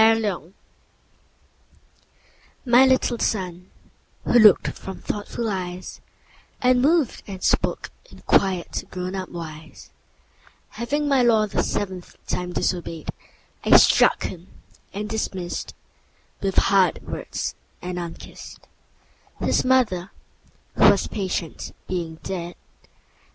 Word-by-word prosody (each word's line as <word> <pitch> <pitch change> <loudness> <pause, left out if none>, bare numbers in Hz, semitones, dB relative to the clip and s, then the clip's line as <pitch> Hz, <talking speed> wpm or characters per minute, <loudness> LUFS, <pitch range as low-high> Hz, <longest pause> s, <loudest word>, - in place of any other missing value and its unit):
The 225 0 +7 0.2
Toys 175 +1 -12 2.1
MY 245 +1 +6
little 255 -2 +2
Son, 180 -3 -2 0.5
who 240 - +4
look'd 210 -4 +6
from 190 - -8
thoughtful 210 +2 -4
eyes 185 -2 -5 0.6
And 250 0 +3
moved 305 -1 +2
and 190 -2 -7
spoke - - 0 0.2
in - - -15
quiet 185 -3 +1
grown 180 0 -4
up 190 -1 -4
wise, 160 -2 -9 0.8
Having 280 +7 -2
my 275 -2 +4
law 225 -3 +4
the 205 - -1
seventh 185 -3 -4
time 180 0 -3
disobey'd, 170 -3 -2 0.5
I - - +8
struck - - +5
him, 180 0 -6 0.4
and 205 +2 -4
dismiss'd 190 -5 -4 0.7
With 195 -1 -1
hard 195 -4 +3
words - - -4 0.3
and 180 0 -5
unkiss'd, 170 -1 -9 0.7
5 - - -2
—His - - +2
Mother, 225 -9 +2 0.7
who - - +8
was - - +3
patient, 185 -5 -4
being 170 -3 -3
dead. 175 -2 -5
190 Hz, 115 wpm, -23 LUFS, 180-225 Hz, 2.1 s, I